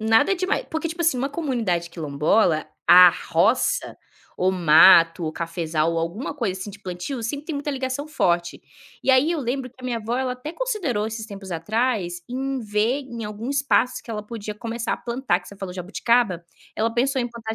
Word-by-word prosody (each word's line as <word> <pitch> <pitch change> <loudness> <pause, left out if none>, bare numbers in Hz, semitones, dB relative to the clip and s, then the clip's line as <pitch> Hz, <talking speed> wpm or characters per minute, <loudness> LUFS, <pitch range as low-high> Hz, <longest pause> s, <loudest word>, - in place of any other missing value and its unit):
nada 225 - +4
demai 380 +6 -1
porque 320 +1 -2
tipo 335 +2 -4
assim, 320 -6 +2
uma 270 +3 -1
comunidade 235 - -2
quilombola, 155 +2 +1 0.2
a 180 0 +9 0.2
roça, - - +1 0.4
ou 185 +1 +2
mato, 165 0 +6
ou 155 - -3
cafezal, 165 -1 -1
ou 165 - -1
alguma 170 +12 -3
coisa 225 -10 -3
assim 195 +2 -6
de 200 - -12
plantio, 185 +8 -5
sempre 285 +6 -4
tem 320 - -3
muita 290 +1 -3
ligação 265 +2 -3
forte, 175 - 0 0.4
e - - +3
aí 265 +6 +4
eu 330 - -2
lembro 255 +1 -3
que 255 - -25
a - - -11
minha 245 -2 -1
avó, 225 +2 -3
ela 260 -1 -1
até 250 +5 -7
considerou 345 - -2
esses 220 0 -6
tempos 200 -3 -9
atrás, 180 0 -1
em 265 +1 -2
ver 215 +5 0
em 235 -5 -7
algum 210 +4 -5
espaço 280 -2 +1
que - - -22
ela 210 -1 -4
podia 215 -2 -6
começar 230 +2 -3
a - - -1
plantar, 235 -7 -1
que 180 - -14
você 200 - -12
falou: 190 -2 -6
"Jabuticaba", 190 0 0 0.3
ela 225 +1 +1
pensou 265 +2 +1
em 240 - -2
plantar 225 -2 -6
225 Hz, 200 wpm, -23 LUFS, 180-265 Hz, 0.4 s, a